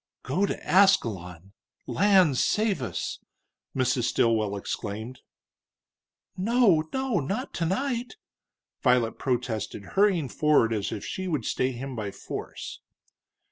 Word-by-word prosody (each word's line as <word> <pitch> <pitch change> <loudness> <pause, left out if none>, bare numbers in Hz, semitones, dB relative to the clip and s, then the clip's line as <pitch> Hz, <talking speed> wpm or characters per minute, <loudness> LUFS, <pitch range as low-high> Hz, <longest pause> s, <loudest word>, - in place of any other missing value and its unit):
"Go 180 - +1
to - - -2
Ascalon! 100 - +2 0.3
Lands 185 -10 +4
save 215 -7 +1
us!" 110 -9 -4 0.6
Mrs. 130 -2 +1
Stilwell 110 -4 +2
exclaimed. 110 +4 -5 1.2
"No, 190 -6 +3
no 265 -4 0
not 200 - -3
tonight!" 240 - -1 0.7
Violet 125 -3 +2
protested, 120 -5 -2
hurrying 195 -7 +3
forward 125 -1 +3
as 105 -2 -2
if 100 - -5
she 190 0 -4
would 150 -10 -1
stay 130 +1 0
him 130 +1 -6
by 105 -3 -3
force. - - -7
135 Hz, 110 wpm, -27 LUFS, -, 1.2 s, Lands